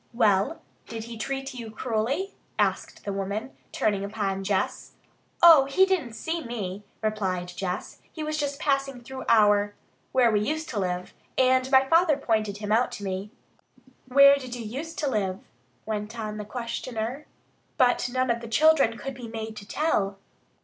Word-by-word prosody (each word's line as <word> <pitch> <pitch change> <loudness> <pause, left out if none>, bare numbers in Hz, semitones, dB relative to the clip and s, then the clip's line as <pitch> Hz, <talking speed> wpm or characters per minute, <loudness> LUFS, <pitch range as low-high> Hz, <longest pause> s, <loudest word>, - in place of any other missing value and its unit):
"Well, 210 +5 +2 0.2
did 225 -1 -6
he 230 +1 -8
treat 270 +4 -4
you 235 -3 -7
cruelly?" 245 - -2 0.2
asked - - -1
the 200 - -2
woman, 200 +6 -4 0.2
turning 200 -2 0
upon 200 -2 -2
Jess. 195 -1 -1 0.5
"Oh, 320 -5 +9
he 325 +8 +4
didn't 355 -12 -1
see 325 +7 -3
me," 210 -5 -5 0.2
replied 190 -5 -1
Jess. 180 0 -4
"He 315 - -6
was 305 0 -2
just 285 -1 -2
passing 275 -3 0
through 265 +2 -7
our 205 -2 +4 0.4
where 245 -3 +4
we 210 - +3
used 310 +9 -2
to 220 - -2
live 180 -1 -3 0.2
and 260 0 +3
my 265 0 +6
father 325 -1 +4
pointed 215 -6 0
him 210 0 -4
out 235 +3 +3
to 205 - -7
me." 190 +1 -3 0.8
"Where 280 +2 +7
did 255 -3 -6
you 235 -2 -6
use 280 +10 -6
to 295 - -1
live?" 195 -7 -1 0.5
went 215 +1 -4
on 215 -1 -4
the 210 - -5
questioner. 235 +3 -4 0.5
But 245 0 +3
none 255 0 +1
of 235 0 -1
the 230 - -7
children 275 -1 +4
could 270 +3 -5
be 245 -2 -8
made 220 -1 -6
to 200 - -9
tell. 205 -9 0
230 Hz, 170 wpm, -26 LUFS, 205-270 Hz, 0.8 s, Oh